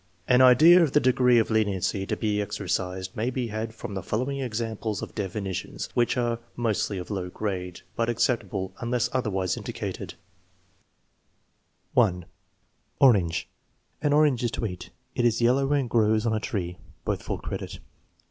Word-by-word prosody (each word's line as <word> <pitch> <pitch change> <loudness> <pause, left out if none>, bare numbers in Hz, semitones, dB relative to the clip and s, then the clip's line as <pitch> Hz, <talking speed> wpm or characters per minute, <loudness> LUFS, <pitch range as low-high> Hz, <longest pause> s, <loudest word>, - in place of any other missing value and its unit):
An 125 +1 +5
idea 155 +8 +8
of 155 -5 +2
the - - +6
degree 125 -2 +4
of 115 0 +2
leniency 100 -2 0
to - - -2
be 105 -1 0
exercised 95 -2 -3
may 115 +3 0
be 125 -2 -3
had 110 +1 -3
from 105 - -7
the 95 - -3
following 130 +8 -2
examples 110 -3 -3
of - - -7
definitions, 100 -2 -4
which 120 0 +1
are 120 -1 0 0.2
mostly 110 -4 -1
of 90 +3 -6
low 95 -3 -3
grade, 90 -3 -4
but 115 0 0
acceptable 105 -5 -1
unless 120 -1 0
otherwise 95 -8 0
indi - - -6
cated: - - -5 1.8
1. 90 -8 +2 0.7
Orange. 100 -11 +4 0.5
"An 145 -1 +1
orange 145 -5 +3
is 120 - +2
to 115 - -3
eat." 90 -4 -6 0.2
"It 120 - 0
is 120 -1 +3
yellow 130 +4 +3
and 140 -3 +2
grows 110 -1 +2
on 115 - +1
a 110 - +1
tree." 90 -5 -4 0.3
(Both - - -1
full - - -3
credit.) - - -6
110 Hz, 160 wpm, -26 LUFS, 100-125 Hz, 1.8 s, idea